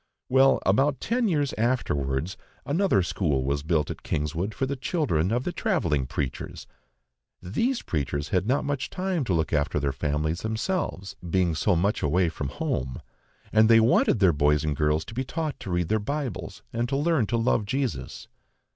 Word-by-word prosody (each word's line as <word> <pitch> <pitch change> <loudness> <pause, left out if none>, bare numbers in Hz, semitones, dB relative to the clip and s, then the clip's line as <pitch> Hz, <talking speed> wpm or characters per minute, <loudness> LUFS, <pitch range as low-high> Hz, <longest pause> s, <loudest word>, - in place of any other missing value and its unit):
Well, 135 +1 +4
about 135 +8 +3
ten 240 0 0
years 145 -7 0
afterwards, 80 - 0 0.3
another 160 - +2
school 75 -8 0
was 70 +2 -1
built 80 -1 0
at - - -8
Kingswood 80 +8 -2
for 135 - 0
the 140 +1 -2
children 130 - 0
of 120 +2 0
the 180 - -2
travelling 85 - 0
preachers. 70 -1 -4 0.7
These 230 - -1
preachers 70 -1 -2
had 95 +2 0
not 135 +4 +1
much 140 -2 -2
time 185 -4 -1
to 95 - 0
look 80 -1 0
after 75 0 +1
their 70 -1 0
families 75 +3 -1
themselves, 110 - -2
being 90 -1 +2
so 95 +4 +2
much 100 +6 +1
away 85 +4 +2
from 75 -4 -4
home, 65 -1 -3 0.5
and 110 +1 +5
they 115 -1 +8
wanted 115 0 +4
their 95 -4 +4
boys 75 0 +2
and 75 -1 -1
girls 75 +1 +1
to - - -9
be 130 +3 -1
taught 155 +3 -3
to - - -7
read 90 -2 0
their 110 - +2
Bibles 135 -1 -4
and 120 +1 -1
to 135 - 0
learn 150 -6 +2
to 115 - 0
love 115 -2 +1
Jesus. 130 +3 -3
100 Hz, 180 wpm, -26 LUFS, -, 0.7 s, they